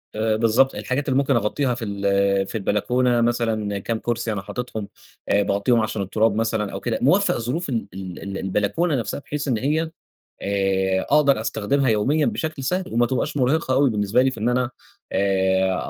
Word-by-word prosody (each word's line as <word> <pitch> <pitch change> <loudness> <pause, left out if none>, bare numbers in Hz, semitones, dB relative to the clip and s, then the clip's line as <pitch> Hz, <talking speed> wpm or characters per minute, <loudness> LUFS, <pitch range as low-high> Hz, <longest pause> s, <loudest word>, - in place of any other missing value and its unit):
آآ، 110 0 +1
بالضبط، 115 +4 +3
الحاجات 140 +3 -2
اللي 130 - +2
ممكن 140 -1 +2
أغطيها 120 +4 0
في 115 - -5
ال 100 -1 +1
في - - -8
البلكونة 120 +4 +1
مثلًا 110 -4 0
كام 110 +3 -3
كرسي 120 -1 -2
أنا 100 - -3
حاطِطهم، 110 0 -5 0.4
آآ 100 0 +3
باغطيهم 100 +4 +2
عشان 110 -1 -2
التراب 105 +2 +1
مثلًا 110 -2 -1
أو - - -5
كده، - - -2
موفّق - - +3
ظروف 130 +9 -3
ال 115 -4 -2
ال 95 -1 -7
ال 100 0 -5
البلكونة 105 - 0
نفسها 115 -1 -3
بحيث 145 0 -5
إن 125 -4 +1
هي 155 +6 0 0.5
آآ، 95 -1 +1
أقدر 140 -5 +3
أستخدمها 130 +5 0
يوميّا 135 +8 +2
بشكل 155 -4 -3
سهل، 180 +5 -2
وما 120 +1 +3
تبقاش 130 +3 -2
مرهقة 135 +2 +1
أوي 135 +1 +4
بالنسبة 105 +2 +2
لي 130 0 +2
في 115 - -8
إن 110 +3 +1
أنا 125 0 0 0.4
آآ، 95 -1 +2
115 Hz, 180 wpm, -22 LUFS, 100-130 Hz, 0.5 s, أوي